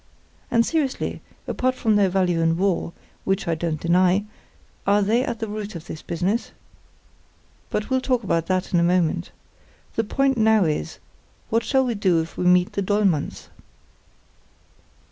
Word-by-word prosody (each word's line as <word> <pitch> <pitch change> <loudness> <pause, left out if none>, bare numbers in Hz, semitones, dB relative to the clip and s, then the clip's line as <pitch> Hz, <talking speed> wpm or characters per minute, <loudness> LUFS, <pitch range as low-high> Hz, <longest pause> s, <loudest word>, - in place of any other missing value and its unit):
And, 230 0 +3
seriously, 295 -4 -1 0.3
apart 255 0 0
from 220 -4 +1
their 200 -2 +4
value 180 -3 +1
in 165 0 +2
war, 185 -3 0 0.3
which 195 -1 -1
I 170 - +1
don't 160 -1 -2
deny, 180 +4 +3 0.6
are 205 +1 +4
they 225 +5 +2
at 240 -3 -3
the 225 0 -4
root 210 -1 -6
of 165 0 -8
this 155 - -8
business? 185 +7 -2 1.2
But 210 +4 -3
we'll 260 0 +2
talk 250 -3 0
about 165 -4 0
that 185 0 -1
in 175 - +4
a - - +3
moment. 170 - +1 0.7
The 225 - +1
point 270 +3 +1
now 220 -3 +4
is, 150 - -2 0.5
what 230 +1 +2
shall 265 +4 +2
we 245 - 0
do 190 -5 +2
if 160 +1 -5
we 180 - -2
meet 180 0 +4
the 200 - -1
Dollmanns?" 195 -6 0
195 Hz, 165 wpm, -23 LUFS, 175-225 Hz, 1.2 s, their